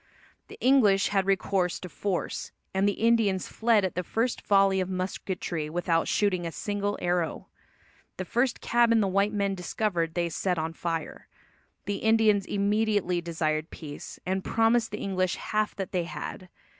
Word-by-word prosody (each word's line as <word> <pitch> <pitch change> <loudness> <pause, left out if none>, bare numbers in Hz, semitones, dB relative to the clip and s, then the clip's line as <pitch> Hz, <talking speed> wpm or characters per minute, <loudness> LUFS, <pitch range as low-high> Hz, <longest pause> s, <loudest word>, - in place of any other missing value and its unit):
The - - -12
English 230 -7 +4
had 195 -2 +1
recourse 190 -2 +1
to 180 - -6
force, 185 +1 -3 0.2
and 195 +1 +2
the - - 0
Indians 220 -5 +2
fled 225 -3 +2
at 185 - -2
the 180 - -1
first 225 +7 -1
volley 195 -1 +3
of 185 - -3
musketry 185 -3 -3
without 170 0 0
shooting 190 -4 +1
a 165 - -3
single 205 +2 -2
arrow. 175 -2 -1 0.7
The 185 - -4
first 240 +6 0
cabin 235 -1 +3
the 205 - +2
white 200 +2 +2
men 200 -2 0
discovered 175 -2 -2
they 170 -1 0
set 180 +2 -1
on 160 +1 -2
fire. 165 -2 -4 0.6
The 200 0 -2
Indians 220 -3 +3
immediately 205 -3 +1
desired 160 -2 -1
peace, 145 -3 -9
and 190 +1 -1
promised 225 0 +2
the - - -5
English 185 -2 -1
half 215 0 -1
that 195 -2 -5
they 180 -3 0
had. 165 +3 -7
190 Hz, 160 wpm, -27 LUFS, 175-210 Hz, 0.7 s, English